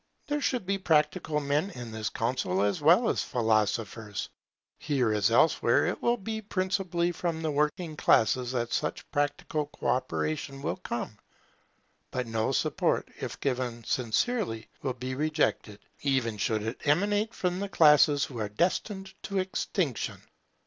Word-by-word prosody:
There 295 Hz, 0 st, -1 dB
should 250 Hz, -7 st, 0 dB
be 195 Hz, +1 st, 0 dB
practical 155 Hz, -2 st, +2 dB
men 145 Hz, +6 st, 0 dB
in 120 Hz, -, -8 dB
this 110 Hz, -2 st, -3 dB
council 115 Hz, -5 st, 0 dB
as 100 Hz, +7 st, 0 dB
well 175 Hz, +10 st, +5 dB
as -, -, +1 dB
philosophers. 110 Hz, -2 st, -1 dB, 0.5 s
Here, 130 Hz, -7 st, +1 dB
as 105 Hz, 0 st, +3 dB
elsewhere, 120 Hz, 0 st, +4 dB
it 175 Hz, -, -2 dB
will 235 Hz, 0 st, +2 dB
be 220 Hz, +1 st, -4 dB
principally 185 Hz, -3 st, 0 dB
from 165 Hz, -1 st, -3 dB
the 155 Hz, -, 0 dB
working 150 Hz, +3 st, 0 dB
classes 125 Hz, -2 st, +3 dB
that 120 Hz, -2 st, -1 dB
such 150 Hz, -, -2 dB
practical 145 Hz, +1 st, -1 dB
co -, -, -12 dB
operation 140 Hz, +2 st, -2 dB
will -, -, -1 dB
come; 120 Hz, -10 st, -5 dB, 0.9 s
but 125 Hz, 0 st, -2 dB
no 115 Hz, +1 st, -1 dB
support, 135 Hz, -, 0 dB
if -, -, -5 dB
given 125 Hz, -3 st, -2 dB
sincerely, 120 Hz, -, -1 dB
will 130 Hz, -2 st, -1 dB
be 130 Hz, +1 st, -5 dB
rejected, 150 Hz, -7 st, 0 dB, 0.2 s
even 130 Hz, -6 st, 0 dB
should 110 Hz, +1 st, 0 dB
it 110 Hz, -, -4 dB
emanate 205 Hz, +8 st, +2 dB
from 180 Hz, 0 st, -1 dB
the 200 Hz, 0 st, -3 dB
classes 150 Hz, -4 st, +5 dB
who 125 Hz, -4 st, -8 dB
are 105 Hz, -2 st, -2 dB
destined 190 Hz, -, -1 dB
to 200 Hz, -, -4 dB
extinction. 185 Hz, -, -1 dB
145 Hz, 150 wpm, -29 LUFS, 115-180 Hz, 0.9 s, well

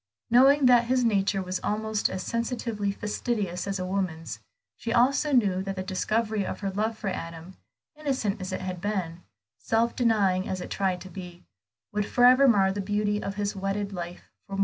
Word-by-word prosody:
Knowing 270 Hz, +3 st, +6 dB
that 245 Hz, -1 st, +6 dB
his 250 Hz, +1 st, +2 dB
nature 195 Hz, -3 st, +1 dB
was 185 Hz, 0 st, -3 dB
almost 215 Hz, 0 st, -1 dB
as 190 Hz, -, -4 dB
sensitively 230 Hz, -3 st, -2 dB
fastidious 205 Hz, -3 st, -3 dB
as 195 Hz, 0 st, -1 dB
a 185 Hz, -, -3 dB
woman's, 185 Hz, -4 st, -3 dB, 0.4 s
she 230 Hz, -, -5 dB
also 275 Hz, +5 st, +3 dB
knew 200 Hz, -8 st, +3 dB
that 195 Hz, 0 st, -4 dB
the 185 Hz, -, -3 dB
discovery 215 Hz, +3 st, -1 dB
of -, -, -5 dB
her 195 Hz, -1 st, -2 dB
love 215 Hz, +3 st, -1 dB
for 210 Hz, -, -3 dB
Adam, 165 Hz, 0 st, -7 dB, 0.4 s
innocent 260 Hz, -9 st, -2 dB
as 185 Hz, +1 st, -4 dB
it -, -, -3 dB
had 185 Hz, -2 st, -5 dB
been, 185 Hz, -5 st, -3 dB, 0.4 s
self 230 Hz, +1 st, +1 dB
denying 200 Hz, -6 st, +2 dB
as 185 Hz, -, -2 dB
it -, -, -7 dB
tried 190 Hz, -2 st, 0 dB
to 190 Hz, -, -9 dB
be, 180 Hz, -2 st, -9 dB, 0.5 s
would 210 Hz, 0 st, -1 dB
forever 255 Hz, +2 st, +6 dB
mar 195 Hz, -5 st, +4 dB
the 200 Hz, +1 st, -3 dB
beauty 205 Hz, +1 st, 0 dB
of 195 Hz, -, -4 dB
his 205 Hz, 0 st, -2 dB
wedded 195 Hz, +1 st, -2 dB
life 175 Hz, -1 st, -7 dB, 0.2 s
for 195 Hz, -, -9 dB
Moor. -, -, -4 dB
200 Hz, 190 wpm, -27 LUFS, 185-230 Hz, 0.5 s, Knowing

